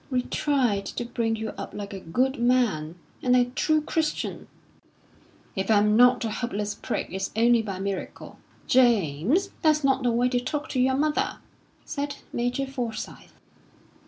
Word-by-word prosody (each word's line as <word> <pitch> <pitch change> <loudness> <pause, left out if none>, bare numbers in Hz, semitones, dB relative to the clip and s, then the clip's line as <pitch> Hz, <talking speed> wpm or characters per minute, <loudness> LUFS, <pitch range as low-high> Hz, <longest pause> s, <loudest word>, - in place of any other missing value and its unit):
"We 255 -2 0
tried 245 -11 0
to 240 - -4
bring 230 -1 -1
you 220 0 -4
up - - -7
like 205 0 -6
a 195 - -5
good 255 +11 0
man, 235 -11 +1 0.3
and 250 -1 +3
a 250 -1 +5
true 305 +5 +1
Christian." 315 0 -2 1.1
"If 190 +1 -2
I'm 210 0 +4
not 245 +1 +5
a 220 - -2
hopeless 210 -3 -3
prig, - - -4
it's 190 0 -2
only 235 +1 +4
by 200 -4 -5
miracle." 195 0 -5 0.3
"James, 240 - +3
that's 305 -2 +3
not 270 -1 +3
the 245 - +2
way 240 +2 +2
to 245 -1 +1
talk 290 +4 -4
to 260 - -1
your 260 +1 +3
mother," 300 +2 0 0.5
said 285 -1 -3 0.2
Major 245 +3 -1
Forsyth. 245 -5 -6
245 Hz, 160 wpm, -26 LUFS, 210-265 Hz, 1.1 s, a